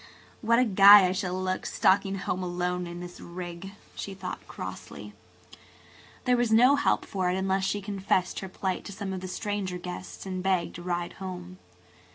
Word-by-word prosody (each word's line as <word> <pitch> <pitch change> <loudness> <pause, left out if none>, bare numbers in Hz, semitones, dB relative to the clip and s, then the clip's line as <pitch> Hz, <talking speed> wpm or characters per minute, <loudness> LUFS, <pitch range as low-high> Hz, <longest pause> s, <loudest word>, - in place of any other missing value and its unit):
"What 230 0 +3
a 250 - +4
guy 200 -1 +9
I 180 - +1
shall 185 -1 -2
look, 185 0 -2
stalking 195 0 +2
home 185 -1 -3
alone 180 0 -2
in 175 0 -7
this 180 0 -9
rig," 175 +2 -7 0.2
she 195 - -6
thought 185 -1 -7
crossly. - - -8 1.1
There 250 -1 +4
was 240 -2 +1
no 250 +5 +6
help 285 - +1
for 185 -3 -1
it 180 - 0
unless 190 0 0
she 205 0 -1
confessed 195 -2 0
her 190 - -7
plight 185 0 -3
to - - -7
some 200 -1 -5
of 185 - -5
the 185 - -5
stranger 195 -1 -3
guests 180 +2 -8
and 185 -1 -4
begged 185 -2 0
a - - -8
drive 175 -1 -2
home. 185 -1 -7
190 Hz, 185 wpm, -28 LUFS, 180-200 Hz, 1.1 s, guy